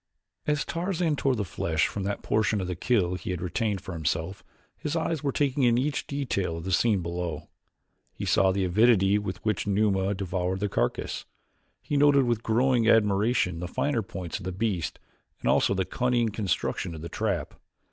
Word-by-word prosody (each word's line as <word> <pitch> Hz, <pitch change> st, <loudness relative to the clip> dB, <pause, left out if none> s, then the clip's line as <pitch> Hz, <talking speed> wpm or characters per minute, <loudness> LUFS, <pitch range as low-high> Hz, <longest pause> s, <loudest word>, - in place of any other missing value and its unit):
As 150 Hz, -1 st, +1 dB
Tarzan 170 Hz, -2 st, -1 dB
tore 135 Hz, -2 st, +1 dB
the 105 Hz, -3 st, -2 dB
flesh 80 Hz, -3 st, 0 dB
from 100 Hz, -, -3 dB
that 100 Hz, 0 st, -3 dB
portion 105 Hz, 0 st, +1 dB
of 95 Hz, -, -2 dB
the 90 Hz, 0 st, -3 dB
kill 90 Hz, -2 st, +1 dB
he 90 Hz, 0 st, -5 dB
had 90 Hz, -2 st, -2 dB
retained 95 Hz, +3 st, -1 dB
for 95 Hz, -, -7 dB
himself 80 Hz, +3 st, -2 dB, 0.3 s
his 150 Hz, +2 st, -4 dB
eyes 160 Hz, -2 st, -1 dB
were 140 Hz, -, 0 dB
taking 140 Hz, 0 st, 0 dB
in 120 Hz, -2 st, +4 dB
each 140 Hz, +2 st, -1 dB
detail 100 Hz, -12 st, -2 dB
of 85 Hz, -, -6 dB
the 95 Hz, -, -3 dB
scene 100 Hz, 0 st, +2 dB
below. 85 Hz, -2 st, -4 dB, 0.6 s
He -, -, -6 dB
saw 95 Hz, -1 st, +4 dB
the 95 Hz, 0 st, 0 dB
avidity 100 Hz, +1 st, +4 dB
with 95 Hz, -3 st, -4 dB
which 105 Hz, -2 st, 0 dB
Numa 100 Hz, -1 st, +2 dB
devoured 95 Hz, 0 st, -2 dB
the 105 Hz, +1 st, -1 dB
carcass; -, -, -2 dB, 0.6 s
he 145 Hz, -, -1 dB
noted 140 Hz, -1 st, +5 dB
with 120 Hz, -3 st, 0 dB
growing 120 Hz, 0 st, +2 dB
admiration 105 Hz, -4 st, +3 dB
the 90 Hz, -, -4 dB
finer 125 Hz, +6 st, 0 dB
points 95 Hz, -4 st, -6 dB
of 95 Hz, -, -10 dB
the 95 Hz, -, -2 dB
beast, 95 Hz, -2 st, -2 dB, 0.4 s
and -, -, -4 dB
also 100 Hz, -, +3 dB
the 95 Hz, -1 st, 0 dB
cunning 120 Hz, 0 st, +1 dB
construction 100 Hz, -4 st, -2 dB
of 80 Hz, -, -8 dB
the -, -, -4 dB
trap. 100 Hz, -6 st, -2 dB
100 Hz, 185 wpm, -27 LUFS, 90-120 Hz, 0.6 s, noted